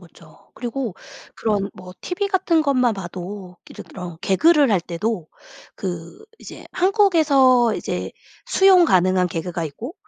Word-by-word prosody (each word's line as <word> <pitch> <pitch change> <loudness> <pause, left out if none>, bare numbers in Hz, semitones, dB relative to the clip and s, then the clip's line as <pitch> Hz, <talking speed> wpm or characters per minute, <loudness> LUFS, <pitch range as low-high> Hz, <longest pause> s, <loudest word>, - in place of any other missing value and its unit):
그쵸. - - -19
그리고 240 -4 -4 0.4
그런 205 -3 -1
뭐 180 0 -12
TV 365 +3 -3
같은 365 -5 +1
것만 255 -6 +2
봐도 185 0 -8
예를 - - -10
들어 180 -3 -9
개그를 285 - +3
할 190 - +2
때도 175 +1 -4 0.5
그 175 - -6 0.2
이제 - - -11
한국에서 310 - +3
이제 - - -4 0.3
수용 385 -7 +5
가능한 185 - +2
개그가 165 0 -4
있고 220 - -7
220 Hz, 270 characters per minute, -21 LUFS, -, 0.5 s, 수용